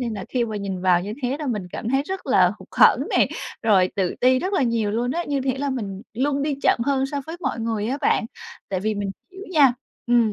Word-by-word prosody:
nên 235 -3 -2
là 195 - -5
khi 245 -2 0
mà 220 -2 -4
nhìn 195 -2 -4
vào 180 -2 +4
như 205 +3 -5
thế 255 +2 0
là 300 - -4
mình 210 -8 -2
cảm 225 - -4
thấy 270 +2 +2
rất 380 +5 -6
là - - +5
hụt - - -14
hẫng - - +5
nè, - - +4 0.4
rồi 195 -5 +4
tự 185 -3 0
ti 255 +1 +4
rất 370 +8 -3
là 380 - +2
nhiều 230 -4 +1
luôn 235 +3 -1
ấy, 340 +5 -2
như 285 -2 -1
thể 260 0 -1
là 280 0 -1
mình 200 -7 -4
luôn 275 +4 0
đi 290 0 0
chậm - - +4
hơn 270 -1 +1
so 280 +1 -3
với 325 +2 -6
mọi 240 - -2
người 225 0 -1
á 270 +3 -2
bạn. 275 - +2 0.4
Tại 190 -2 -2
vì 215 +2 -1
mình 200 -1 -3 0.2
hiểu 380 +1 -10
nha, 285 -6 +6 0.3
ừm, 235 -3 +3
245 Hz, 260 wpm, -23 LUFS, 210-280 Hz, 0.4 s, nha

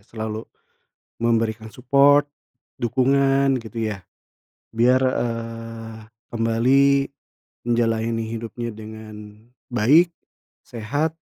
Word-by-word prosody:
selalu 110 +1 -6 0.7
memberikan 115 -1 0
support, 140 +4 +4 0.6
dukungan 135 +2 +2
gitu 110 -1 -4
ya, 100 - -8 0.7
biar, 125 +3 +4
eee, 115 -3 -3 0.4
kembali 115 +5 +3 0.8
menjalani 115 -1 0
hidupnya 115 +1 -5
dengan 110 -1 -10 0.3
baik, 155 +10 +4 0.5
sehat. 145 +8 -2
115 Hz, 75 wpm, -22 LUFS, 110-130 Hz, 0.8 s, support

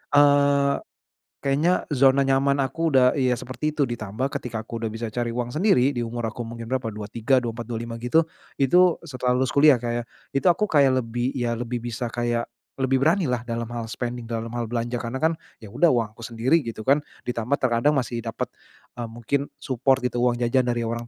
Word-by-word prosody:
eee, 140 -1 +5 0.7
kayaknya 155 +7 +2
zona 135 0 +5
nyaman 135 +1 +2
aku 160 +5 0
udah 125 -1 +5
iya, 130 -2 +2
seperti 130 +4 -3
itu 145 -2 +2
ditambah 120 +2 -4
ketika 110 -3 -4
aku 115 -1 -6
udah 110 - -1
bisa 115 +1 -5
cari 120 -1 -1
uang 120 +1 -3
sendiri 145 -7 +3
di 120 - -2
umur 120 0 -3
aku 120 - -7
mungkin 115 0 -7
berapa 130 -3 -1
23, 110 +5 0
24, 115 -1 -4
25 115 0 -4
gitu, 160 +7 +3 0.4
itu 175 +6 +5
setelah 125 -2 -1
lulus 130 0 +1
kuliah, 145 -2 +6
Kak, 120 -1 -2
ya, 120 - -2 0.3
itu 135 +6 -1
aku 210 +5 +3
kayak 140 -4 +4
lebih 120 +3 -2
iya, 120 -1 0
lebih 120 0 -3
bisa 120 +1 -3
kayak 120 -1 0 0.3
lebih 135 0 +1
beranilah 160 -8 +2
dalam 115 -1 -3
hal 120 -1 -4
spending, 120 +1 -4
dalam 115 0 -3
hal 120 - -1
belanja 120 +1 -2
karena 115 +2 -5
kan, 160 +4 +2 0.3
"Ya 100 - -10
udah 175 - +3
uang 115 -3 0
aku 110 - -26
sendiri," 120 +8 +2
gitu 115 -5 -6
kan. 140 +6 +4 0.2
Ditambah 125 +3 -1
terkadang 130 +4 +2
masih 120 -2 -1
dapet, 115 -1 -4 0.5
eee, 120 - -3
mungkin 120 +5 -2
support 130 -1 0
gitu 125 -1 -1
uang 120 0 +2
jajan 120 +1 +1
dari 120 -1 0
orang 115 +1 -3
125 Hz, 195 wpm, -24 LUFS, 115-135 Hz, 0.7 s, kuliah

